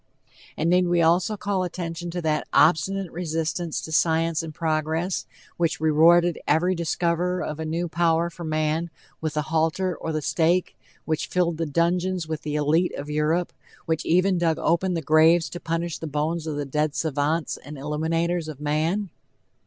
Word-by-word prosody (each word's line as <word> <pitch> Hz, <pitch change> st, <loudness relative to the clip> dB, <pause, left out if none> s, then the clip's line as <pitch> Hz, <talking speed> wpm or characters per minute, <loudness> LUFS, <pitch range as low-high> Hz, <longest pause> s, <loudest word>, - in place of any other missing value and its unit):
And 160 Hz, -, 0 dB
need 180 Hz, 0 st, +4 dB
we 175 Hz, -1 st, +3 dB
also 175 Hz, +6 st, +2 dB
call 200 Hz, -2 st, -1 dB
attention 175 Hz, -1 st, -5 dB
to 175 Hz, 0 st, -4 dB
that 155 Hz, -1 st, 0 dB
obstinate 180 Hz, +3 st, +3 dB
resistance 165 Hz, 0 st, -2 dB
to 160 Hz, -, -8 dB
science 165 Hz, 0 st, +2 dB
and 165 Hz, -1 st, -6 dB
progress, 160 Hz, +3 st, -1 dB, 0.3 s
which 170 Hz, -2 st, 0 dB
rewarded 165 Hz, +2 st, +4 dB
every 175 Hz, +5 st, +3 dB
discoverer 170 Hz, +1 st, 0 dB
of 155 Hz, 0 st, -5 dB
a 160 Hz, -, -3 dB
new 165 Hz, +2 st, -2 dB
power 170 Hz, 0 st, +1 dB
for 170 Hz, -, -9 dB
man, 155 Hz, +1 st, -1 dB, 0.3 s
with 155 Hz, -1 st, -3 dB
the 150 Hz, -, 0 dB
halter 165 Hz, +4 st, 0 dB
or 160 Hz, -, -4 dB
the 155 Hz, -1 st, -2 dB
stake, 170 Hz, +4 st, +1 dB, 0.3 s
which 155 Hz, -1 st, -1 dB
filled 170 Hz, -3 st, 0 dB
the 165 Hz, -1 st, -2 dB
dungeons 175 Hz, +3 st, 0 dB
with 155 Hz, -1 st, -4 dB
the 150 Hz, -1 st, -4 dB
elite 155 Hz, +4 st, +1 dB
of 145 Hz, +1 st, -6 dB
Europe, 155 Hz, +4 st, 0 dB, 0.3 s
which 160 Hz, -1 st, -1 dB
even 180 Hz, +2 st, +2 dB
dug 165 Hz, -2 st, +1 dB
open 180 Hz, +2 st, +1 dB
graves 160 Hz, +2 st, +4 dB
to 175 Hz, -, -6 dB
punish 165 Hz, 0 st, -3 dB
the 160 Hz, -, -5 dB
bones 155 Hz, +3 st, -2 dB
of 155 Hz, -, -2 dB
the 145 Hz, 0 st, -3 dB
dead 150 Hz, +2 st, -1 dB
savants 155 Hz, +1 st, -1 dB
and 145 Hz, +2 st, -10 dB
illuminators 160 Hz, +4 st, -1 dB
of 155 Hz, -3 st, -7 dB
man? 160 Hz, +6 st, -1 dB
165 Hz, 170 wpm, -24 LUFS, 155-175 Hz, 0.3 s, need